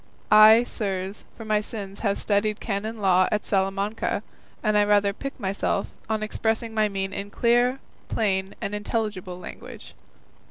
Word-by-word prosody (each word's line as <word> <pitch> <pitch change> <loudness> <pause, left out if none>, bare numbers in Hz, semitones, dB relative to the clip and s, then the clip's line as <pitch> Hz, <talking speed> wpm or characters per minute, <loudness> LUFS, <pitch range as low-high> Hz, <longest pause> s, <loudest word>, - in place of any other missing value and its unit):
I, 215 +2 +8
sirs, 195 -4 -4
for 225 - -8
my 215 -1 +2
sins 200 -3 -7
have 200 -3 0
studied 210 +1 0
canon 220 +1 -3
law 185 -3 +4
at 210 - -1
Salamanca, 195 +2 -1 0.4
and 215 -2 +2
I 210 - +5
rather 205 -1 +3
pique 275 +6 -7
myself 195 0 -1 0.2
on 220 -1 0
expressing 220 +1 -1
my 215 -1 +2
meaning 195 -1 -3
in 200 +1 -6
clear, 240 +4 +2 0.3
plain, 190 -3 0
and 200 - -3
intelligible 205 -4 -3
language." 180 - -10
210 Hz, 150 wpm, -25 LUFS, 195-220 Hz, 0.4 s, I